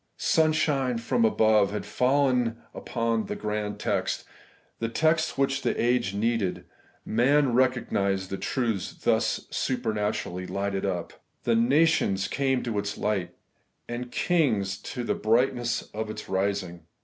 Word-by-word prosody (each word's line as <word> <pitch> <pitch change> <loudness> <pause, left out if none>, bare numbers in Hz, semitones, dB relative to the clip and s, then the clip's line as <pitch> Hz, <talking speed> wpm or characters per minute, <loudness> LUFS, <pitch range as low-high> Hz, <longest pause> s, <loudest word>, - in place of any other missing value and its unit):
Sunshine 150 -5 +2
from 120 +1 0
above 110 -2 +4
had 105 +1 -4
fallen 125 -3 +2 0.2
upon 115 -2 -1
one - - -4
grand 105 -1 -3
text; - - -1 0.5
the 115 - -1
text 160 +6 +1
which 135 0 +1
the - - -1
age 120 -4 +1
needed: 110 -3 -1 0.4
men 130 +4 +3
recognised 100 -7 +1
the 95 - -2
truth 115 -6 -2
thus - - +1
super 125 -4 -1
naturally 105 -3 -2
lighted 100 0 -2
up. 90 -3 -4 0.2
'The 115 - +2
nations 120 -6 +3
came 135 -2 0
to 115 -4 -1
its 100 0 -4
light, 95 -5 -1 0.5
and 120 +1 -5
kings 115 - +1
to 125 - -5
the - - 0
brightness 120 +1 +1
of 110 0 -3
its 110 - -7
rising.' 95 -2 -1
115 Hz, 135 wpm, -27 LUFS, 100-130 Hz, 0.5 s, above